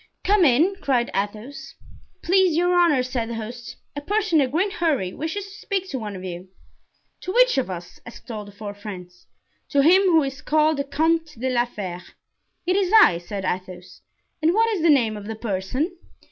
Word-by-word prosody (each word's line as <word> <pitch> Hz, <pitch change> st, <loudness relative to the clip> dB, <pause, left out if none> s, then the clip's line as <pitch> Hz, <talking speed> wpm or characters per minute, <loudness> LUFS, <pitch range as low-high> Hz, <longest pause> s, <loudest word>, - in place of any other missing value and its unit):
"Come 410 Hz, -1 st, +3 dB
in," 315 Hz, +9 st, +3 dB
cried 250 Hz, -4 st, 0 dB
Athos. 225 Hz, +8 st, -5 dB, 0.5 s
"Please 370 Hz, -2 st, +3 dB
your 355 Hz, +1 st, +2 dB
honors," 305 Hz, -8 st, +3 dB
said 240 Hz, -3 st, -3 dB
the 235 Hz, -, -4 dB
host, 235 Hz, +2 st, -7 dB, 0.2 s
"a 290 Hz, -, -4 dB
person 370 Hz, -2 st, +1 dB
in 270 Hz, -, +2 dB
a -, -, -10 dB
great 375 Hz, +8 st, 0 dB
hurry 300 Hz, -, 0 dB
wishes 325 Hz, +6 st, -4 dB
to 395 Hz, -, -13 dB
speak 400 Hz, -2 st, -3 dB
to 265 Hz, -, -3 dB
one 210 Hz, -3 st, -6 dB
of 185 Hz, -, -8 dB
you." 180 Hz, 0 st, -7 dB, 0.7 s
"To 370 Hz, -, -5 dB
which -, -, +4 dB
of 255 Hz, -, -3 dB
us?" 175 Hz, -2 st, -8 dB
asked 240 Hz, +1 st, -11 dB
all 215 Hz, -2 st, -5 dB
the 205 Hz, -, -12 dB
four 205 Hz, 0 st, -7 dB
friends. 185 Hz, -4 st, -10 dB, 0.4 s
"To 280 Hz, -1 st, +3 dB
him 360 Hz, +6 st, +6 dB
who 325 Hz, -4 st, +4 dB
is 270 Hz, -1 st, -5 dB
called 310 Hz, 0 st, +2 dB
the 280 Hz, -, -2 dB
Comte 320 Hz, -1 st, 0 dB
de 260 Hz, +1 st, -1 dB
la 240 Hz, -1 st, +2 dB
Fere." 185 Hz, -7 st, -6 dB, 0.6 s
"It 365 Hz, +1 st, +1 dB
is 390 Hz, -2 st, +1 dB
I," 295 Hz, -, +7 dB
said 190 Hz, +2 st, -6 dB
Athos, 185 Hz, -1 st, -5 dB, 0.4 s
"and 325 Hz, +4 st, +3 dB
what 455 Hz, +1 st, +3 dB
is 400 Hz, -6 st, -1 dB
the 335 Hz, -, +3 dB
name 235 Hz, -7 st, +3 dB
of 205 Hz, -1 st, -8 dB
the 220 Hz, -, -4 dB
person?" 220 Hz, -, -3 dB
270 Hz, 200 wpm, -23 LUFS, 210-345 Hz, 0.7 s, I